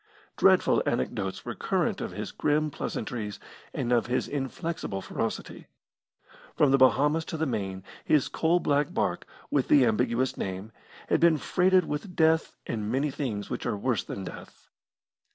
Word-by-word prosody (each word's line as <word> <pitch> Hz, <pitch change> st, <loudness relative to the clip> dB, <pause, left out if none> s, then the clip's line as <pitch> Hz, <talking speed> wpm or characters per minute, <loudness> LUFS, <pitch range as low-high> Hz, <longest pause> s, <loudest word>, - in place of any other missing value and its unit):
Dreadful -, -, +4 dB
anecdotes 95 Hz, -, -2 dB
were -, -, -3 dB
current -, -, -1 dB
of -, -, -3 dB
his -, -, -6 dB
grim 150 Hz, +1 st, +1 dB
pleasantries 105 Hz, -6 st, -4 dB, 0.3 s
and 120 Hz, -, -2 dB
of 120 Hz, -1 st, +3 dB
his 125 Hz, -, 0 dB
inflexible 145 Hz, -, -3 dB
ferocity. -, -, -4 dB, 0.9 s
From 145 Hz, -, +4 dB
the 135 Hz, -, +4 dB
Bahamas 145 Hz, +5 st, +4 dB
to 160 Hz, -, -5 dB
the 160 Hz, -, 0 dB
Main 95 Hz, -7 st, -3 dB, 0.2 s
his 150 Hz, -3 st, +3 dB
coal 165 Hz, +2 st, +2 dB
black 145 Hz, -3 st, +1 dB
barque, -, -, -1 dB, 0.2 s
with 140 Hz, -3 st, +1 dB
the 140 Hz, -4 st, +6 dB
ambiguous 115 Hz, +3 st, +1 dB
name, 95 Hz, +3 st, -4 dB, 0.4 s
had -, -, +2 dB
been 165 Hz, -2 st, +5 dB
freighted 185 Hz, +4 st, +3 dB
with 160 Hz, +5 st, -5 dB
death 160 Hz, 0 st, +3 dB
and 110 Hz, -2 st, -3 dB
many 140 Hz, +3 st, 0 dB
things 125 Hz, -8 st, -4 dB
which -, -, -3 dB
are -, -, -1 dB
worse 120 Hz, +1 st, 0 dB
than 100 Hz, -, -6 dB
death. 90 Hz, -, -11 dB
135 Hz, 155 wpm, -28 LUFS, 105-155 Hz, 0.9 s, the